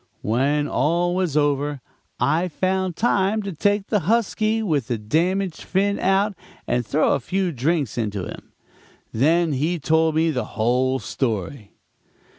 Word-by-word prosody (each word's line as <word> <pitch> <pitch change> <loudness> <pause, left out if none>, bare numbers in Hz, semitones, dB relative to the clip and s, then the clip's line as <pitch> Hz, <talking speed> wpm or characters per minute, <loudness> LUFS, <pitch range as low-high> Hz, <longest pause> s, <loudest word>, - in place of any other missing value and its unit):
"When 140 +7 +1
all 170 +6 +1
was 180 -5 0
over, 145 -1 +1 0.4
I 155 +8 +2
found 185 +1 -1
time 210 -1 +1
to 200 -1 -4
take 205 +5 +1
the 210 - +1
husky, 220 +3 +1
with 150 - 0
the 120 - -1
damaged 170 - -1
fin 200 +2 0
out 195 +2 +2 0.3
and 120 0 0
throw 140 +8 +2
a - - +1
few 190 -1 -1
drinks 140 -2 -1
into 105 -4 -2
him. - - -10 0.6
Then 160 +7 +2
he 155 +6 0
told 160 +1 +2
me 160 +1 +2
the 125 -5 -1
whole 125 +4 +2
story. 110 -2 -3
160 Hz, 145 wpm, -22 LUFS, 130-190 Hz, 0.6 s, I